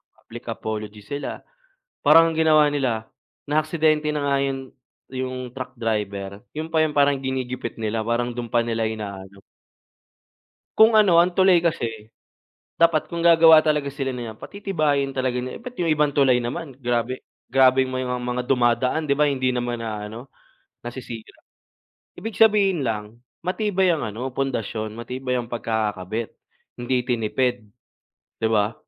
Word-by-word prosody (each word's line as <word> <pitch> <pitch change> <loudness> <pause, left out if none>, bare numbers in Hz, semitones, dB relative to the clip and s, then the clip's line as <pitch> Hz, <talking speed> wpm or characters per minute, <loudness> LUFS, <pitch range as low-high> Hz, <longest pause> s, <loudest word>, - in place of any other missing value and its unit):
public - - -12
apology 105 -1 -5
sila. 140 +7 -5 0.6
Parang 165 0 +6
ginawa 155 -2 +5
nila, 125 -6 -1 0.4
na 150 +2 +2
aksidente 155 -1 +1
na 150 -1 -2
nga 140 - +2
yung 135 -1 -4 0.3
yung 130 -1 -5
truck 130 -1 -7
driver 100 -3 -3
yun 155 +1 -5
pa 160 - +4
yung 155 -2 0
parang 140 -1 +3
ginigipit 130 -3 -4
nila, 110 0 -2
parang 120 +2 -1
dun 120 -1 -5
pa 120 - +2
nila 115 -1 -1
inaano. 100 -3 -7 1.4
Kung 220 0 +7
ano 180 -5 +6
ang 180 - +1
tulay 185 -3 +5
kasi, 115 -10 -2 0.7
dapat 165 -1 +3
kung 170 - -2
gagawa 165 -1 +8
talaga 150 -2 +1
sila 135 -1 -3
niyan 115 -3 -6
patitibayin 155 -9 -1
talaga 130 -1 -1
nila, 125 - -5
ba't 250 0 -9
yung 175 - 0
ibang 150 -1 +2
tulay 130 -3 +4
naman 130 +4 -5
grabe 120 +1 -1 0.3
grabeng 130 0 +4
may 130 0 -2
mga 125 0 -2
dumadaan, 125 +4 +2
'di 140 - +2
ba 150 +1 +3
hindi 130 -2 0
naman 120 -1 -2
naaano, 110 +2 -6 0.6
nasisira. 120 -2 -8 0.8
Ibig 225 -1 -6
sabihin 200 -7 +4
lang 105 -1 -3 0.3
matibay 190 0 +1
ang 155 - -4
ano 110 +4 -4
pundasyon, 115 -5 -2
matibay 125 +2 -3
ang 120 - -5
pagkakakabit, 110 -2 -3 0.4
hindi 125 +1 0
tinipid, 125 0 0 0.8
'di 110 - +3
ba. 105 0 +2
130 Hz, 145 wpm, -23 LUFS, 115-150 Hz, 1.4 s, gagawa